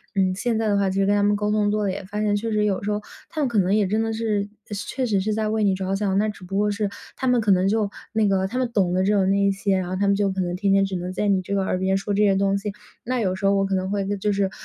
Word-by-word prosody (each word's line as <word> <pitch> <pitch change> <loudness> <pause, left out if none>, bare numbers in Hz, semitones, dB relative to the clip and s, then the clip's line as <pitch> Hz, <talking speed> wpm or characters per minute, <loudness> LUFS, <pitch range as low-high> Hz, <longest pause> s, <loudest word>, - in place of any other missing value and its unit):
嗯， 190 -1 +2
现 225 +3 -1
在 225 - 0
的 205 -1 +2
话 200 -1 +2
其 190 +1 -1
实 195 - +3
跟 205 +1 +3
他 205 - +2
们 205 0 +3
沟 210 0 -1
通 210 -1 +2
多 210 0 0
了 195 - 0
也 190 - -5
发 205 +2 -5
现 210 -1 +1
确 225 +2 -2
实 210 -1 +1
有 200 -2 -1
时 210 - -1
候， 210 0 -1 0.3
他 - - -6
们 290 - +2
可 235 -3 -2
能 190 -1 +3
也 210 -2 +3
真 215 +3 0
的 225 - -1
是 215 -2 -1 0.2
是 205 +1 -4
确 260 -1 -2
实 205 -5 +1
是 215 +3 -1
在 215 0 -1
为 215 0 0
你 200 -2 +3
着 190 0 -2
想， 195 -1 0
那 210 +2 +2
只 210 -2 -7
不 195 +2 -4
过 210 +1 +2
是 205 0 -1 0.3
他 - - -4
们 250 -1 +3
可 215 -3 +2
能 185 0 +3
就 215 -1 +1 0.2
那 220 -2 +2
个 190 -1 +1
他 245 - -5
们 255 -2 0
懂 190 -5 +2
的 185 - +2
只 205 - +2
有 195 -2 +3
那 195 +1 +2
一 200 0 +3
些， 195 0 0
然 185 -1 -2
后 185 - -3
他 200 +2 0
们 200 - +3
就 200 0 +1
可 190 0 -2
能 175 -1 -2
天 195 +1 +2
天 195 0 +4
只 195 -1 -2
能 180 +1 -5
在 205 +2 0
你 195 -2 +2
这 200 +2 -3
个 195 - +1
耳 185 - -1
边 190 +1 +1
说 200 +1 -2
这 200 - +1
些 200 -2 +4
东 195 0 +2
西。 200 0 -4 0.3
那 250 0 -1
有 185 -4 0
时 190 +2 -4
候 195 - +4
我 195 0 +2
可 195 0 -1
能 185 0 -1
会 200 -1 -1
就 210 +2 0
是， 195 -1 +1
200 Hz, 375 characters per minute, -23 LUFS, 195-210 Hz, 0.3 s, 天